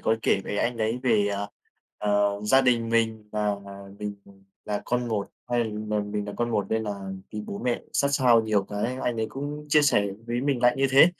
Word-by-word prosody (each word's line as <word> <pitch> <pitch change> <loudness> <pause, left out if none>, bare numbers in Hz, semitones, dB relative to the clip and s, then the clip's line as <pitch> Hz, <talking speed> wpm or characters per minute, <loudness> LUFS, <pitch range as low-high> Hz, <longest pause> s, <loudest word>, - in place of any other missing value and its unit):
có 110 - +2
kể 95 - +3
với 100 - -3
anh 120 0 0
đấy 115 +2 -1
về, 110 -5 +3
à, 100 0 -2 0.5
ờ, 100 -1 +1
gia 135 +5 +5
đình 120 -3 +2
mình 110 -2 0
và 105 -1 +1 0.4
mình 105 -1 -4 0.5
là 105 -1 -2
con 125 0 -1
một. 105 -3 -1 0.2
Hay 120 -1 +2
mà 105 -1 -2
mình 105 0 -3
là 105 - -5
con 120 0 0
một 105 -3 0
nên 110 0 0
là 100 -2 -4 0.3
bị 105 - -4
bố 100 - -5
mẹ 125 -1 -1
sát 140 - +2
sao 125 -4 +5
nhiều 105 -2 +2
cái 105 +6 -3
anh 120 - 0
ấy 110 0 0
cũng 145 +2 -6
chia 150 0 +5
sẻ 105 -8 +3 0.2
với 120 +1 -1
mình 135 -2 0
lại 120 0 +5
như 135 0 +3
thế. 135 +4 +8
110 Hz, 220 wpm, -26 LUFS, 105-125 Hz, 0.5 s, thế